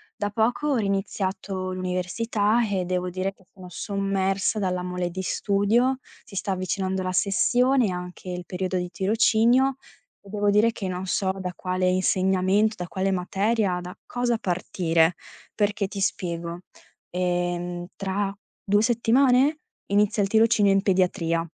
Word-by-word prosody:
da 205 - -2
poco 225 +7 0
ho 290 - +2
riniziato 195 -2 -2
l'università 205 +5 0
e 190 -2 -1
devo 180 0 -1
dire 185 +2 -2
che 190 -1 -26
sono 185 -2 -13
sommersa 195 +2 -1
dalla 180 -2 -1
mole 180 -1 -2
di 190 +2 -5
studio. 220 +8 +1 0.3
Si 215 - -14
sta 195 - -2
avvicinando 190 0 -1
la 185 0 -2
sessione 245 +6 +3
e - - -1
anche 180 +1 -7
il 180 -1 -5
periodo 185 0 -2
di 180 0 -3
tirocinio 230 +6 +3 0.4
e 200 - -16
devo 205 0 +1
dire 210 +3 +4
che 205 -4 -5
non 185 +1 -4
so 190 +1 +1
da 180 -1 -3
quale 185 0 -1
insegnamento, 190 +3 +2
da 180 - -5
quale 190 +2 -1
materia, 195 +1 0
da 180 +1 -9
cosa 245 -1 0
partire. 170 -3 +1 0.4
Perché 205 -1 0
ti 200 +1 -7
spiego: 170 -2 -2 0.5
ehm, 175 0 -2
tra 195 0 -2 0.3
2 205 +1 +3
settimane 250 +5 +3 0.3
inizia 205 +1 +2
il 195 - +1
tirocinio 220 -2 +4
in 195 0 +3
pediatria 175 -3 +1
195 Hz, 145 wpm, -25 LUFS, 180-210 Hz, 0.5 s, dire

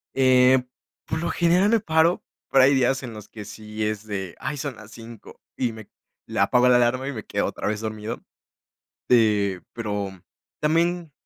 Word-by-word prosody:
Eh, 130 -1 +5 0.4
por 160 - -3
lo 170 - -2
general 180 +4 +3
me 230 0 +4
paro, 160 -1 +2 0.3
pero 135 -1 +5
hay 135 +2 +5
días 135 0 +1
en 120 -3 -7
los 105 -2 -11
que 105 -2 -9
sí 110 +1 -6
es 110 0 -3
de: 95 -4 -5
"Ay, 150 - -4
son 140 -2 -4
las 110 0 -14
5", 115 -1 -12 0.2
y 125 -2 -1
me 110 -2 -11 0.4
la - - +1
apago 125 0 +3
la 125 -1 +6
alarma, 125 +2 +1
y 140 - -3
me 110 -4 -7
quedo - - -1
otra - - -4
vez 105 0 -2
dormido, 110 +1 -5 0.9
eh, 105 -6 +3
pero 105 -3 -3 0.5
también. 165 +2 +1
120 Hz, 180 wpm, -24 LUFS, 110-140 Hz, 0.9 s, la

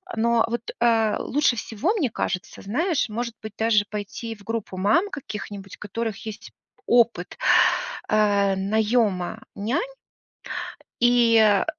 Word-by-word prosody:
Но 230 0 +3
вот, 230 0 -2 0.2
э, 225 -2 +3
лучше 285 -3 +1
всего, 235 - -1
мне 320 - 0
кажется, 180 -4 -4
знаешь, 295 - 0
может 235 +2 -4
быть, 215 -1 -8
даже 220 -2 +3
пойти 215 +2 -5
в 205 - -17
группу 225 -3 -4
мам 215 - +2
каких-нибудь, 205 - -7
у - - -58
которых 220 +1 -4
есть 220 -2 -8 0.3
опыт, 230 -7 +2 0.7
а, 205 -2 +3
наёма 215 -1 0
нянь, 230 - -1 1.2
и, 240 -1 +5
э, 205 -2 +4
220 Hz, 125 wpm, -24 LUFS, 205-235 Hz, 1.2 s, и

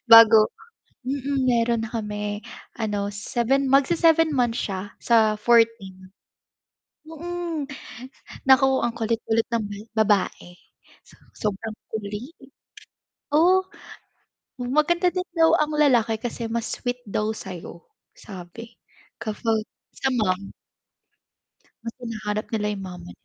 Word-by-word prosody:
bago, 225 -1 +9 0.6
mm, 275 0 -1
meron 235 -1 +2
na - - -11
kami 210 -1 -3 0.3
ano, 205 -3 -2
seven, 255 +6 0
mag-se-seven 320 +3 +4
months 240 -3 +1
siya 195 0 -5
sa 220 -2 +3
14. 215 -5 +2 1.0
Hmm, 325 -2 -5 0.8
naku 265 0 +5
ang 235 -1 -2
kulit-kulit 225 0 0
ng 230 - +1 0.3
ba 220 -1 +3
babae 190 -3 0 0.8
sobrang 215 +1 -3 0.2
kulit. 215 +7 -5 1.0
Oh, 365 +5 +5 0.9
maganda 305 +8 +1
din 365 0 -2
daw 325 0 +5
ang 305 0 0
lalaki 240 -7 +3
kasi 230 0 -5
mas 230 0 -2
sweet 245 -1 -3
daw 210 +1 -1
sa'yo 180 -4 -9 0.3
sabi 200 +5 -10 0.5
kapag 220 0 -1 0.3
sa 270 - -1
mom. 200 -6 -1 1.3
Mas 230 0 -5
hinahanap 215 -3 -4
nila 215 -2 -1
yung 195 - -7
mama. 180 - -10
230 Hz, 105 wpm, -24 LUFS, 210-270 Hz, 1.3 s, bago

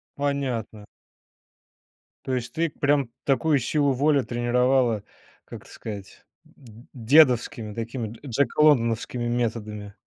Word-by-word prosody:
Понятно. 130 -7 -3 1.4
То 130 - -1
есть 120 -1 -4
ты 165 +2 0
прям 145 -3 0
такую 145 +2 +2
силу 145 +3 +1
воли 140 +2 +2
тренировала, 120 -2 +1 0.4
как - - -10
это - - -17
сказать, 100 -3 -9 0.2
д 115 -2 -17
дедовскими 120 -4 +3
такими 115 +1 -4
дж 115 - -12
джеколондановскими 125 -3 +2
методами. 110 -4 -3
120 Hz, 105 wpm, -24 LUFS, 115-140 Hz, 1.4 s, дедовскими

